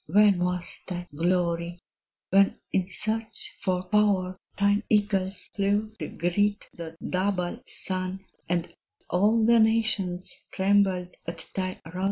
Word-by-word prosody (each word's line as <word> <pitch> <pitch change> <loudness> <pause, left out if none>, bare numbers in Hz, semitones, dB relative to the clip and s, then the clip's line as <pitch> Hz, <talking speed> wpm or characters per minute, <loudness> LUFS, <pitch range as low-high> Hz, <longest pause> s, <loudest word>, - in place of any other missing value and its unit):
When 200 +2 +5
was 180 -1 -2
thy 175 -1 -5
glory! 170 +1 0 0.5
when 195 +1 +4
in 185 -1 0
search 220 0 -1
for 185 -2 0
power 190 -2 +2 0.2
Thine 200 +1 +3
eagles 200 -3 +2
flew 205 +2 0
to - - -3
greet 205 +4 0
the 165 -1 -8
double 185 -1 -1
sun, 185 +1 -3 0.2
And 175 -1 -1 0.4
all 215 +5 +3
the 235 0 +6
nations 220 -5 +2 0.2
trembled 190 -2 +2
at 165 -1 -6
thy 185 -1 -3
rod? 175 +3 -7
190 Hz, 125 wpm, -27 LUFS, 180-205 Hz, 0.5 s, the